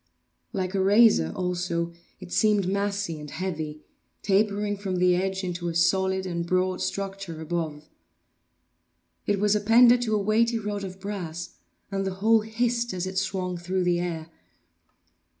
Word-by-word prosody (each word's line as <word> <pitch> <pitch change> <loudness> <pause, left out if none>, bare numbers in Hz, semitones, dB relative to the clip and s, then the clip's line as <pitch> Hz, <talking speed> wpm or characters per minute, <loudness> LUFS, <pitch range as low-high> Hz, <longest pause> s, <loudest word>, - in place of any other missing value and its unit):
Like 185 -1 -2
a 195 - +1
razor 200 - +5
also, 175 -2 -2 0.3
it 185 -2 -11
seemed 210 -3 +3
massy 200 -4 -1
and 150 0 -8
heavy, 155 -4 -4 0.4
tapering 205 +1 +1
from 195 -2 -3
the 180 0 +3
edge 190 +1 -1
into 175 -1 -3
a 170 - -3
solid 190 +2 +2
and 170 -2 -2
broad 185 +1 0
structure 195 -3 -4
above. 160 -2 -4 1.4
It 205 -1 +1
was 210 +1 +3
appended 235 +4 +6
to 220 -3 0
a - - +2
weighty 225 +3 +2
rod 205 -2 -4
of 190 0 -7
brass, 180 -4 -5 0.4
and 195 0 -1
the 190 -1 -3
whole 220 +3 +4
hissed 235 0 -1
as 180 0 -2
it 190 0 -1
swung 185 -2 -2
through 185 +2 -1
the 175 -1 +2
air. 165 -2 -4
190 Hz, 150 wpm, -26 LUFS, 175-205 Hz, 1.4 s, appended